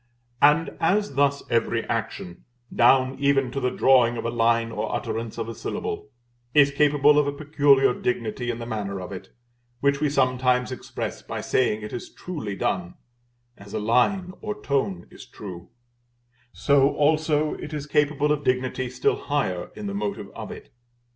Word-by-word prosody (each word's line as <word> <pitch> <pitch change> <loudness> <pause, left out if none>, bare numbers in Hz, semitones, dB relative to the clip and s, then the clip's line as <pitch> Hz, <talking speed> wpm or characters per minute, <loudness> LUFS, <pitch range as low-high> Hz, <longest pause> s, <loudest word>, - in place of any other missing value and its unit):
And 150 +3 +4
as 195 +1 +1
thus 140 +1 +2
every 115 -1 +1
action, 95 -6 -4 0.3
down 130 +2 +4
even 140 -2 +2
to 135 - -3
the 125 -1 +1
drawing 125 -2 +4
of 115 - -4
a 115 - -1
line 115 0 +2
or - - -3
utterance 115 0 -4
of 115 -1 -3
a 115 - -5
syllable, 105 - -5 0.5
is 140 -2 +6
capable 145 0 +4
of 145 - +1
a - - 0
peculiar 145 -3 +3
dignity 120 0 -2
in 120 - -2
the 120 - -6
manner 100 -4 -4
of 90 0 -7
it, 95 0 -8 0.5
which 140 +1 +1
we 150 - +2
sometimes 130 -2 +1
express 130 - -5
by - - -6
saying 110 -4 0
it 105 - -7
is 120 - -6
truly 120 - -6
done 180 - -2 0.6
(as 100 0 -10
a - - 0
line 125 - +1
or 210 0 -5
tone 130 - -1
is - - -13
true), 90 -4 -9 0.8
so 140 0 +3
also 155 0 +2
it 150 - -7
is 150 -2 -4
capable 150 0 +1
of 150 -1 0
dignity 130 -1 0
still 125 - 0
higher 105 -12 -1
in 210 - -7
the 200 - -3
motive 200 - -4
of - - -7
it. - - -11
130 Hz, 170 wpm, -24 LUFS, 115-145 Hz, 0.8 s, is